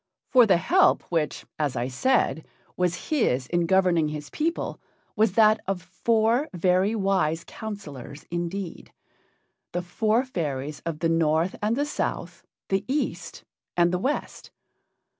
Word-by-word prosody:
For 250 Hz, -3 st, +7 dB
the 190 Hz, -4 st, +5 dB
help 370 Hz, -, +3 dB
which, 160 Hz, -3 st, -1 dB
as 145 Hz, -4 st, 0 dB
I 120 Hz, 0 st, -1 dB
said, 160 Hz, -, +1 dB, 0.3 s
was 175 Hz, -1 st, -1 dB
his 135 Hz, -, +1 dB
in 170 Hz, +4 st, 0 dB
governing 180 Hz, -4 st, +3 dB
his 150 Hz, -1 st, -6 dB
people 330 Hz, +2 st, -2 dB, 0.3 s
was 215 Hz, -3 st, +3 dB
that 215 Hz, 0 st, +5 dB
of 195 Hz, -1 st, -1 dB
four 225 Hz, +8 st, +1 dB
very 185 Hz, +4 st, +2 dB
wise 185 Hz, -5 st, +1 dB
counselors 155 Hz, -, -8 dB
indeed 175 Hz, +1 st, -4 dB, 0.8 s
the 175 Hz, 0 st, -2 dB
four 220 Hz, +7 st, +1 dB
fairies 150 Hz, -, -3 dB
of 155 Hz, -2 st, -4 dB
the 165 Hz, -, +2 dB
North 165 Hz, +2 st, +2 dB
and 215 Hz, +2 st, +1 dB
the 285 Hz, +3 st, 0 dB
South, 295 Hz, -, -4 dB, 0.3 s
the 195 Hz, 0 st, +1 dB
East 285 Hz, +3 st, -3 dB, 0.3 s
and 175 Hz, 0 st, +4 dB
the 180 Hz, -, +1 dB
West. 275 Hz, +9 st, -3 dB
180 Hz, 140 wpm, -25 LUFS, 165-220 Hz, 0.8 s, For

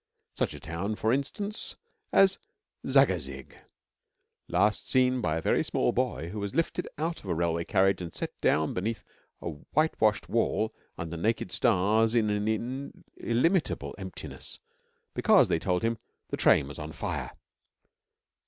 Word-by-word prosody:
Such -, -, -1 dB
a -, -, -9 dB
town, 90 Hz, +6 st, -3 dB
for 110 Hz, +2 st, +1 dB
instance, 200 Hz, -, -2 dB, 0.4 s
as 195 Hz, -1 st, +5 dB, 0.5 s
Zagazig, 70 Hz, 0 st, +2 dB, 0.9 s
last 105 Hz, +1 st, +1 dB
seen 130 Hz, -1 st, +3 dB
by 80 Hz, -5 st, 0 dB
a -, -, -2 dB
very -, -, +2 dB
small -, -, +1 dB
boy 80 Hz, +4 st, -1 dB
who 105 Hz, +4 st, -5 dB
was 100 Hz, +4 st, -4 dB
lifted 165 Hz, +1 st, 0 dB
out 165 Hz, +3 st, -2 dB
of -, -, -11 dB
a 85 Hz, -, +1 dB
railway 85 Hz, 0 st, 0 dB
carriage 95 Hz, -1 st, +2 dB
and 85 Hz, -2 st, -5 dB
set -, -, -4 dB
down 80 Hz, 0 st, +2 dB
beneath 110 Hz, +5 st, -2 dB, 0.4 s
a -, -, -2 dB, 0.3 s
whitewashed 125 Hz, -9 st, +2 dB
wall 110 Hz, -1 st, +1 dB, 0.2 s
under 85 Hz, 0 st, -5 dB
naked 110 Hz, +7 st, 0 dB
stars 110 Hz, +1 st, +3 dB
in 110 Hz, -3 st, +3 dB
an 110 Hz, +6 st, -2 dB
illimitable 160 Hz, +10 st, +1 dB
emptiness 95 Hz, -1 st, -7 dB, 0.6 s
because, -, -, +5 dB
they 80 Hz, -, +2 dB
told 90 Hz, +1 st, 0 dB
him, 115 Hz, -1 st, 0 dB, 0.3 s
the -, -, -1 dB
train 70 Hz, -, +4 dB
was 75 Hz, -, -9 dB
on 75 Hz, +1 st, -6 dB
fire. -, -, -3 dB
105 Hz, 145 wpm, -29 LUFS, 85-125 Hz, 0.9 s, as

